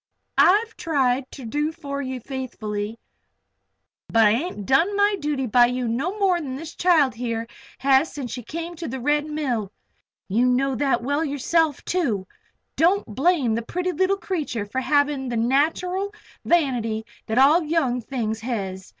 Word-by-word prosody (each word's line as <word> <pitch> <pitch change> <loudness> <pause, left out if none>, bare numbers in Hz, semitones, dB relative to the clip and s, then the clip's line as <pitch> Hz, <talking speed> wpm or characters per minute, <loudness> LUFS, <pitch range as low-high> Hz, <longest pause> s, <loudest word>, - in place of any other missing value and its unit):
I've 440 +4 +4
tried 265 -5 0
ter 265 - -10
do 295 +7 -1
for 280 -4 -5
ye 260 -1 -4
faithfully. 225 -4 -5 1.1
But 225 -1 +4
I 210 - +6
ain't 235 - -2
done 330 - +3
my 405 0 +3
duty 290 -3 -1
by 240 +1 +5
you 250 0 -2
no 285 - -2
more 375 -4 +2
than 265 -4 -5
this 320 +4 -7
child 320 -7 +3
here 230 -1 -3 0.3
has 275 +3 +3
since 265 -5 -6
she's 245 -3 -6
come 330 +6 -4
here 345 +1 -7
to 335 - -5
the 265 +2 -4
Red 295 +3 +1
Mill. 255 -10 -2 0.6
You 230 +6 +2
know 265 +2 +2
that 260 -1 +1
well 285 +5 0
yourself, 300 +1 0
too. 245 - 0 0.5
Don't 360 +6 +3
blame 275 - +2
the 230 - 0
pretty 360 +10 -2
leetle 375 +4 +1
creetur 300 - -3
for 260 +6 -3
havin' 285 -1 +1
the 240 - -2
nateral 330 - 0 0.3
vanity 240 -10 +1 0.2
that 220 - -1
all 290 +6 +6
young 300 -6 0
things 225 -2 -3
hez. 195 -6 -4
270 Hz, 165 wpm, -23 LUFS, 240-325 Hz, 1.1 s, I